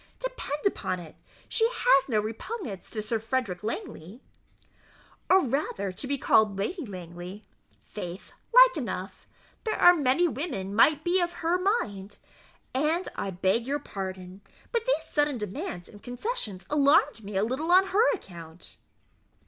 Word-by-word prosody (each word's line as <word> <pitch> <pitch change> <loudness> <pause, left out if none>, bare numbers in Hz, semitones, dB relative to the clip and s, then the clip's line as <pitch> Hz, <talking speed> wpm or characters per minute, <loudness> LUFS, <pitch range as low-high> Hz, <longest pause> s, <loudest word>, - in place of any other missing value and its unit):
Depend - - -4
upon 185 - 0
it, 165 -3 -11 0.3
she 455 0 +2
has 280 - +3
no 220 -3 +2
repugnance 225 - -5
to 215 -2 -4
Sir 220 +1 -1
Frederick 225 -5 -2
Langley." 220 - -6 1.1
"Or 380 0 +6
rather 230 -7 -1
to 210 +8 -6
be 280 +1 0
called 215 -5 +3
Lady 290 - -3
Langley? 180 +1 -8 0.4
faith, 180 -2 -8 0.2
like - - +8
enough - - -5 0.4
there 440 - -1
are 355 - +9
many 300 +2 +2
women 255 - -4
might 295 +8 +4
be 360 +2 +2
of 345 0 -1
her 350 +2 +2
mind; 210 - -1 0.6
and 310 +7 +1
I - - -3
beg 190 +6 0
your 285 +2 0
pardon, 190 -6 -7 0.3
but 470 0 -1
these 410 -10 +2
sudden 295 -3 0
demands 185 -4 -5
and 205 - -14
concessions 245 - -4
alarmed 285 -4 +4
me 200 -1 -4
a 195 - +2
little 265 +9 -1
on 380 +2 +6
her 435 +6 +4
account." 170 - -10
250 Hz, 150 wpm, -27 LUFS, -, 1.1 s, are